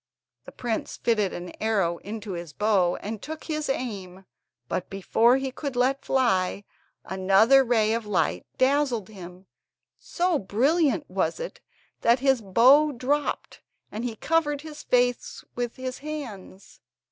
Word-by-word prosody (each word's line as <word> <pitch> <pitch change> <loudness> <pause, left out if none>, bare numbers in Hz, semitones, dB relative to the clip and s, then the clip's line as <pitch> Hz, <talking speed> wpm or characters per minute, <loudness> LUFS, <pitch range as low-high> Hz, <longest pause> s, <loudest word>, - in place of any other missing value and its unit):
The - - -10
prince 235 -3 -4
fitted 215 -5 +1
an 175 0 -7
arrow 195 -6 +1
into 210 0 -7
his 170 -4 -6
bow 195 -4 +2
and 215 +1 -5
took 315 +1 -7
his 305 -2 -3
aim, 195 -8 -4 0.4
but, 185 - -3
before 225 +6 +3
he 270 -1 -3
could 275 0 -5
let 260 +3 +1
fly, 200 -7 +1 0.4
another 195 +8 +4
ray 225 -3 +2
of 230 -2 -3
light 175 -7 0
dazzled 260 -6 +1
him; 185 -2 -11 0.5
so 350 -3 0
brilliant 275 - +1
was - - -1
it, - - -6 0.4
that 235 +1 +4
his 265 -2 +2
bow 255 +10 +5
dropped, 280 +3 -2 0.3
and 220 +3 -5
he 240 -2 -3
covered 295 +2 0
his 300 -1 -9
face 245 0 0
with 240 -1 -3
his 255 0 -5
hands. 255 -11 -8
235 Hz, 140 wpm, -26 LUFS, 195-275 Hz, 0.5 s, bow